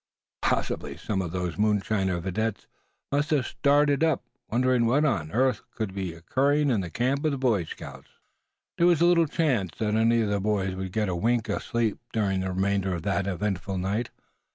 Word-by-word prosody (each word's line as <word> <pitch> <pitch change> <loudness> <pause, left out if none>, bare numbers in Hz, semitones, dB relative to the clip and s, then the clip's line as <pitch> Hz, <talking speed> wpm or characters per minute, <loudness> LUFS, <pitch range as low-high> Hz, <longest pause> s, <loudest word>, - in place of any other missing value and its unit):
Possibly - - -1
some 100 -3 -2
of 85 -3 -4
those 90 -2 -3
moonshiner 100 -3 +1
videttes 100 +4 -2 0.5
must 145 +3 +1
have 145 -6 +2
started 145 +4 +2
up, 160 -1 +2 0.3
wondering 125 0 +2
what 140 +6 +3
on 85 - 0
earth 125 -2 +2
could 110 -4 -3
be 95 -3 -3
occurring 140 - +1
in 110 -5 +1
the 90 - -5
camp 130 - 0
of 155 - +2
the 140 - -2
Boy 115 -9 +1
Scouts. - - -9 0.7
There 170 - +5
was 170 -2 +4
little 170 -2 +5
chance 125 - 0
that 105 -1 -1
any 115 +1 +3
of 110 - 0
the 100 0 0
boys 100 -2 0
would 95 0 -5
get 110 +1 0
a 90 - -1
wink 115 +4 0
of 100 - -1
sleep 115 -3 -1
during 100 -4 +1
the 95 0 -2
remainder 95 0 0
of 85 - -6
that 100 0 0
eventful 95 -1 -2
night. 100 +6 -1
110 Hz, 190 wpm, -26 LUFS, 95-130 Hz, 0.7 s, There